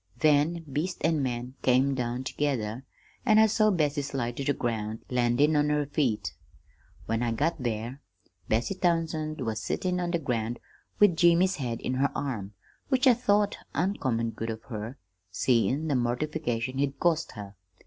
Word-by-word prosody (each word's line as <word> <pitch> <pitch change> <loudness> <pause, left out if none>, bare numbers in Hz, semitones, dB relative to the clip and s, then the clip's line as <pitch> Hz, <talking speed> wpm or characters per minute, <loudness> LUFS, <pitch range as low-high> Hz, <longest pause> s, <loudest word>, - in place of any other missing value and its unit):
Then 155 +2 +3
beast 150 +5 -3
and 160 -2 +2
man 125 -1 -3
came 130 +2 +3
down 125 0 -2
together, 130 -4 -2 0.4
and 215 0 +5
I 220 - +8
saw 215 0 +3
Bessie 150 -6 +1
slide 135 -4 -3
to 140 - -2
the 145 - +2
ground, 110 -4 -3
landin' 125 +5 +3
on 150 0 +3
her 150 -1 +1
feet. 120 - -1 0.7
"When 115 +1 -1
I 120 -1 0
got 150 +6 0
there 120 +3 -3 0.5
Bessie 115 - +1
Townsend 165 -4 -1
was 110 -3 -2
sittin' 180 -1 -1
on 175 -1 -1
the 170 - +1
ground, 120 -6 -2 0.4
with 205 -5 +5
Jimmy's 175 +3 +4
head 120 -5 -3
in 125 - -2
her 135 +2 +2
arms, 110 -8 -3 0.4
which 260 -1 +2
I 255 - +8
thought 205 -3 +2 0.2
uncommon 130 - 0
good 115 0 -5
of 110 0 -5
her, 110 +2 -5 0.3
seein' 130 - +1
the 150 - +1
mortification 125 0 -1
he'd 140 0 -1
caused 165 -2 +1
her. 100 -1 -9
135 Hz, 165 wpm, -28 LUFS, 120-160 Hz, 0.7 s, I